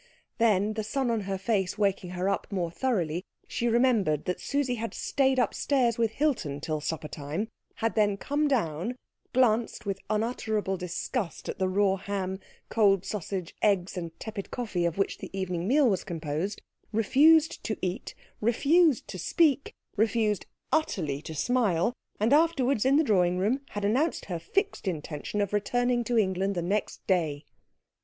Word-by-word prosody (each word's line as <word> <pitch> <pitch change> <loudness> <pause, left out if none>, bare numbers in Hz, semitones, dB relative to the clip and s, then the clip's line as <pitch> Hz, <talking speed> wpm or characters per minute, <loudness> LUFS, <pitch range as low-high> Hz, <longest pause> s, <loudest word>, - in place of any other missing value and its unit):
Then, 215 -2 +3
the 220 0 -3
sun 245 +3 -1
on 225 -2 0
her 195 - -1
face 195 -2 0
waking 195 -3 0
her 185 +2 0
up 195 +1 -1
more 175 -4 -1
thoroughly, 180 -8 -1 0.2
she 240 - -1
remembered 230 - +2
that 180 - -2
Susie 280 -3 0
had 230 - -4
stayed 265 -2 +1
upstairs 245 0 +1
with 225 -2 +1
Hilton 230 - 0
till 155 +1 -3
supper 155 0 -3
time, 155 +10 -4 0.3
had 225 -2 -1
then 205 -1 +2
come 290 +8 0
down, 210 - 0 0.4
glanced 235 -3 +2
with 195 -1 -2
unutterable 215 -2 -1
disgust 180 +3 -4
at - - -5
the 190 - +2
raw 195 0 +2
ham, 190 -1 -3 0.3
cold 195 -4 +3
sausage, 190 -3 -4
eggs, 195 -3 +2
and 170 -2 -6
tepid 215 -3 -6
coffee 210 -8 -2
of 170 0 -1
which 195 - 0
the - - -7
evening 180 -1 -2
meal 280 +3 +4
was 195 -5 +1
composed, 165 +4 -3 0.3
refused 295 +9 +4
to 215 - -2
eat, 180 +1 -4 0.2
refused 285 +6 +3
to 185 - -6
speak, 290 - +2 0.2
refused 215 -1 +1 0.2
utterly 160 - 0
to 160 0 -7
smile, 225 - +1 0.3
and 220 +6 +3
afterwards 280 -7 +3
in 270 +1 +5
the 310 - +5
drawing 180 - +3
room 220 +9 +1
had 205 -1 -1
announced 265 +11 +1
her 175 -4 -4
fixed 395 - -1
intention 160 +3 -3
of 200 0 -2
returning 245 +4 +1
to 240 0 0
England 195 -1 +1
the 175 - -1
next 200 +4 -2
day. 155 -6 0
205 Hz, 165 wpm, -28 LUFS, 180-245 Hz, 0.4 s, in